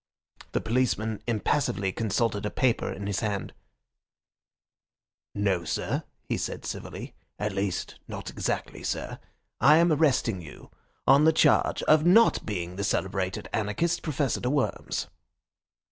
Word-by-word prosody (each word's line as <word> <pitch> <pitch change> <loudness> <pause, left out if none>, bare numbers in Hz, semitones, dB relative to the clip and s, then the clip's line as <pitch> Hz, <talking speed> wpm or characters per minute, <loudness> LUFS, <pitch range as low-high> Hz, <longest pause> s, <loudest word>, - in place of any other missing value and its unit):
The - - +1
policeman 110 -3 0
impassively 115 -3 0
consulted 110 0 0
a 105 - -1
paper 125 0 +1
in 100 - -6
his 100 -1 -1
hand, 105 -3 -3 1.8
'No, 95 -4 +1
sir,' 80 - -2 0.2
he - - -2
said - - -4
civilly, - - -6 0.2
'at 105 0 -2
least, 95 -1 -3
not - - -6
exactly, - - -3
sir. - - -3 0.4
I 150 - +7
am 170 -1 +4
arresting 130 - +2
you 75 -3 -12 0.3
on 140 +3 +6
the 160 - +7
charge 160 - +3
of 155 0 +5
not 190 +7 +5
being 90 -3 -4
the 100 - -2
celebrated 95 -1 -1
anarchist, 110 +12 0
Professor 145 -4 -1
de 125 - -1
Worms. 140 -1 -1
110 Hz, 130 wpm, -27 LUFS, 100-140 Hz, 1.8 s, I